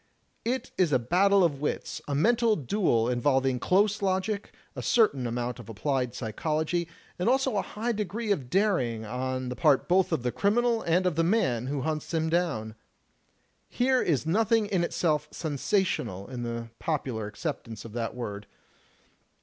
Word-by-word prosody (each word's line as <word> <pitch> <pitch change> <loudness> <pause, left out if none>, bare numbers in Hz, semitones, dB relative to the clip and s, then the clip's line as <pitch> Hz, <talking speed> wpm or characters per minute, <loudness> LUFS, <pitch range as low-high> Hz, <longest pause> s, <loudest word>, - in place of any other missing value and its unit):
It 250 +3 -2
is 175 -5 +3
a 130 - +5
battle 190 +10 +3
of 145 -5 +1
wits, 150 - -3
a 145 - -1
mental 230 +7 +3
duel, 135 - +1
involving 130 +1 +1
close 205 - +2
logic, 195 +2 -1 0.2
a - - -4
certain 140 - +3
amount 120 +1 -3
of 115 - -11
applied 125 +2 -1
psychology, 155 +9 -1 0.3
and 180 - +2
also 265 -2 +2
a 200 - +2
high 225 +5 -3
degree 215 +1 -2
of 135 -11 -1
daring 130 - +1
on 130 +2 -3
the 125 - -4
part 150 -3 +3
both 185 +1 +3
of 120 - 0
the 125 - 0
criminal 230 - +2
and 175 +1 +1
of 175 -4 0
the 165 - +3
man 165 - +1
who 140 -1 -2
himts 155 +2 -2
him 160 0 +1
down. 160 -11 0 1.0
Here 255 +1 +2
is 150 -4 +1
nothing 220 +5 +2
in 190 -4 0
itself 160 -3 0
'sensational' 145 - -1
in 125 -2 -5
the 115 -1 -4
popular 130 -9 -2
acceptance 115 -2 -5
of 110 - -9
that 115 -1 -3
word. 105 -4 -5
155 Hz, 165 wpm, -28 LUFS, 125-200 Hz, 1.0 s, a